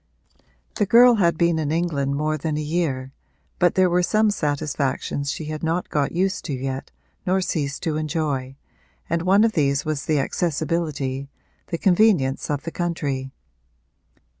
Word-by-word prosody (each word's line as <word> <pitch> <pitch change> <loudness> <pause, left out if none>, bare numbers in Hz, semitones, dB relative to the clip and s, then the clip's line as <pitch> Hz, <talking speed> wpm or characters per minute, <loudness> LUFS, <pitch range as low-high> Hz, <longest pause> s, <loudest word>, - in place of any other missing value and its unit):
The 205 - +1
girl 240 +4 +7
had 170 -5 +2
been 170 -1 +2
in 150 -2 -1
England 150 -5 0
more 155 +2 0
than 155 0 -2
a - - -1
year, 150 -4 -2 0.5
but 175 -1 +3
there 185 -1 +4
were 180 0 +2
some 215 +4 +2
satisfactions 145 -3 -2
she 160 - -5
had 155 0 -5
not 165 +2 -1
got 145 -2 0
used 190 +3 0
to 150 - -3
yet 135 +1 -4 0.4
nor 185 +1 +3
ceased 145 -6 -2
to 155 -2 -1
enjoy, 150 -4 -2 0.6
and 170 0 +1
one 195 +4 +4
of 225 - +3
these 140 -6 +1
was 155 -2 -2
the 155 - +2
accessibility, 145 -3 -1 0.4
the 170 - -3
convenience 175 -8 +3
of 145 -2 -2
the 165 - -5
country. 145 -7 -2
155 Hz, 160 wpm, -23 LUFS, 140-175 Hz, 0.6 s, girl